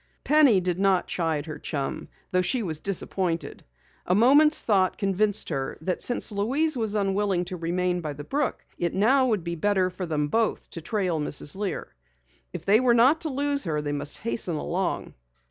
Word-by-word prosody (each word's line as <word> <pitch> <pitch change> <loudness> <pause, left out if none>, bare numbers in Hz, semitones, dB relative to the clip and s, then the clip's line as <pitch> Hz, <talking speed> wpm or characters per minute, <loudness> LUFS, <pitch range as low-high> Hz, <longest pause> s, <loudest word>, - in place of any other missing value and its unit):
Penny 285 -9 +5
did 180 0 -2
not 195 -2 +2
chide 160 -4 -2
her 155 -2 -7
chum, 140 -3 -4 0.2
though 185 - +2
she 235 +6 0
was 160 -5 -3
disappointed. 185 -2 -2 0.4
A 180 - +3
moment's 285 +8 +5
thought 190 -4 +2
convinced 205 +1 0
her 135 -4 -3
that 180 +4 -3
since 245 - +1
Louise 270 +10 0
was 220 -3 -2
unwilling 195 -2 0
to 185 - -5
remain 180 +1 -1
by 155 -3 -4
the 145 +1 -8
brook, 280 - -2
it 170 - -1
now 255 +7 +3
would 215 -7 0
be 170 0 -3
better 185 +1 +1
for 180 0 -5
them 150 -2 -1
both 225 +8 -1
to 165 - -7
trail 180 -2 -1
Mrs. 150 +1 -1
Lear. 200 -1 -4 0.6
If 175 -2 -7
they 205 +3 +5
were 245 -2 +3
not 265 +8 +4
to 320 - -1
lose 285 -1 +1
her, 155 -3 -1
they 150 -1 -3
must 145 0 -2
hasten 215 -6 -2
along. 175 +5 -3
190 Hz, 185 wpm, -25 LUFS, 170-225 Hz, 0.6 s, Penny